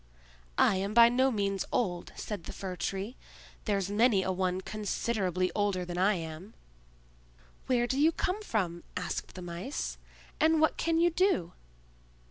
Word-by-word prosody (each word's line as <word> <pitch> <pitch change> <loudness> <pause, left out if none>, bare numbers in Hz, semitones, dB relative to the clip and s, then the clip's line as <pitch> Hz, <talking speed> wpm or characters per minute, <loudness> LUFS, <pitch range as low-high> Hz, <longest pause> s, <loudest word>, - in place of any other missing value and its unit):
"I 190 - +4
am 200 +3 -2
by 235 0 +9
no 260 +2 +3
means 200 -5 0
old," 175 -7 -1
said 205 -6 -5
the - - -6
Fir 185 -2 -5
tree. 195 +6 -3 0.5
"There's 200 -2 0
many 210 -2 +4
a 190 - 0
one 185 0 0
considerably 195 -3 -1
older 200 -3 0
than 175 0 -4
I 200 +3 +4
am." 165 +4 -7 1.1
"Where 245 -2 +3
do 260 +3 -1
you 315 +3 +5
come 370 +5 -2
from," 185 - -1 0.2
asked - - -4
the 185 - -7
Mice; 175 +10 -4 0.4
"and 320 0 +4
what 315 - +3
can 330 -1 +1
you 345 +1 +4
do?" 335 - +1
200 Hz, 155 wpm, -30 LUFS, 185-245 Hz, 1.1 s, by